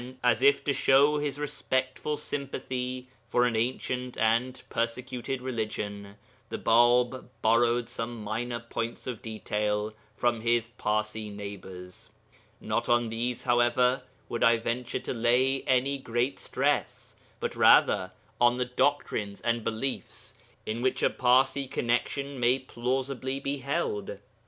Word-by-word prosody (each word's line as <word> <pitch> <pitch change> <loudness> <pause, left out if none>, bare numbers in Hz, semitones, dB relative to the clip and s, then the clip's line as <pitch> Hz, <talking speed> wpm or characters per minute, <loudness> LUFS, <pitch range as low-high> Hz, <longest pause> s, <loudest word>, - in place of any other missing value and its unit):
As 120 -2 +3
if 140 0 +5
to 140 - +1
show 140 +3 +4
his 145 -2 -2
respectful 145 0 -2
sympathy 130 -3 -4 0.2
for 120 - +3
an 120 -2 +1
ancient 125 +2 -2
and 115 +3 +1
persecuted 125 +2 -3
religion 105 -4 -4 0.3
the - - -3
Bāb 120 +2 +3 0.2
borrowed 120 +1 +3
some 115 -2 -5
minor 120 +3 -3
points 115 0 -4
of 125 -4 -5
detail 105 -1 -2 0.2
from 120 -2 +1
his 115 0 +1
Parsi 110 -2 -2
neighbours. 95 -3 -9 0.5
Not - - -2
on 120 -1 +3
these, 120 +2 -2
however, 120 +1 +3 0.3
would 120 - -2
I 115 -1 +6
venture 120 +2 -2
to - - -3
lay 125 +3 +2
any 135 +2 +2
great 120 +1 -1
stress, - - -1 0.2
but - - -3
rather 95 0 +5 0.3
on 120 0 +4
the 125 - 0
doctrines 125 -6 0
and 115 -1 0
beliefs 115 +5 -3 0.3
in 110 +2 -3
which 130 +1 0
a - - +4
Parsi 130 +2 +3
connexion 135 +3 -1
may 125 +2 +4
plausibly 130 +1 -2
be 140 +1 -2
held. 125 -8 -2
120 Hz, 130 wpm, -28 LUFS, 115-130 Hz, 0.5 s, I